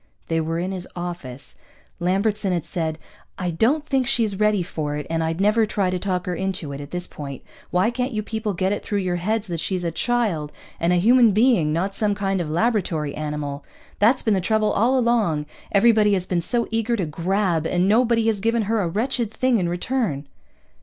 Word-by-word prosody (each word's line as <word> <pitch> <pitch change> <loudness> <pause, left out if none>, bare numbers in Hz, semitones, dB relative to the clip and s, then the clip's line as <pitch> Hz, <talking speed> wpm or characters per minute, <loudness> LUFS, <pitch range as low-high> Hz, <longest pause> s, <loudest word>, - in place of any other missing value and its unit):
They 165 0 +1
were 165 +1 -2
in 180 +3 -2
his 185 -1 -5
office. 145 -7 -7 0.4
Lambertson 195 +3 +1
had 175 -3 -1
said, 160 -3 -3 0.4
"I 180 -2 -2
don't 260 - +1
think 265 -4 0
she's 220 -6 0
ready 210 -3 +3
for 150 -3 -3
it, 150 -1 -4
and 165 0 0
I'd 165 +1 -2
never 215 +2 +3
try 195 -3 0
to 185 - -1
talk 180 -1 -2
her 180 - -2
into 185 -4 -3
it, 140 - -6
at 145 - -9
this 180 +1 -3
point. 140 -2 -8 0.3
Why 185 +6 +2
can't 250 +2 -2
you 215 -2 -2
people 220 -2 -3
get 190 +2 0
it 205 - -1
through 205 - -2
your 175 -1 0
heads 215 +5 -1
that 170 -4 -3
she's 185 +2 -2
a 170 - -1
child, 200 - 0 0.3
and 170 +1 +2
a - - +4
human 230 +4 +5
being, 215 -8 +3
not 185 +5 -1
some 205 0 0
kind 195 -2 -1
of 160 - -4
laboratory 165 -5 0
animal? 150 -1 -4 0.4
That's 230 +5 +4
been 220 - +2
the 190 - +1
trouble 215 +3 +1
all 245 +6 +2
along. 225 -11 +1 0.3
Everybody 210 0 +4
has 185 -2 0
been 180 -2 0
so 235 +7 0
eager 225 +1 +1
to 195 -6 -1
grab, 170 +1 0
and 180 +1 +1
nobody 230 +1 +3
has 220 -3 +1
given 230 +2 +1
her 220 +1 0
a 180 - 0
wretched 230 +5 -1
thing 255 0 +2
in 175 -2 0
return." 175 - -1
195 Hz, 210 wpm, -23 LUFS, 170-225 Hz, 0.4 s, human